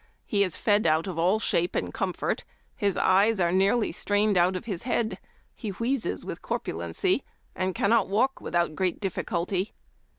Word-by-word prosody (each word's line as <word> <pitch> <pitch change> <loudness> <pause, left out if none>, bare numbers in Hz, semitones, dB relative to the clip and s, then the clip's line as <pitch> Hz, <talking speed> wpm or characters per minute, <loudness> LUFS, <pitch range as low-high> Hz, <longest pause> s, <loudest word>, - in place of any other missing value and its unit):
He 200 -1 +2
is 185 -4 -2
fed 205 -3 +2
out 160 +1 +3
of 180 -4 -4
all 180 +5 +3
shape 175 -5 0
and - - -2
com - - -1
fort; - - -2 0.3
his 200 -4 0
eyes 200 +3 +4
are 170 -1 +2
nearly 195 +5 +2
strained 205 0 +1
out 180 +1 +3
of 185 - -5
his 195 -7 -3
head; 235 -2 -1 0.3
he 220 - -6
wheezes 230 +6 -2
with - - -6
corpulency, 375 -1 -1 0.3
and 185 0 -1
cannot 225 0 +3
walk 255 +7 +1
without 170 -2 0
great 185 0 0
difficulty. 185 0 -2
195 Hz, 170 wpm, -27 LUFS, 180-220 Hz, 0.3 s, eyes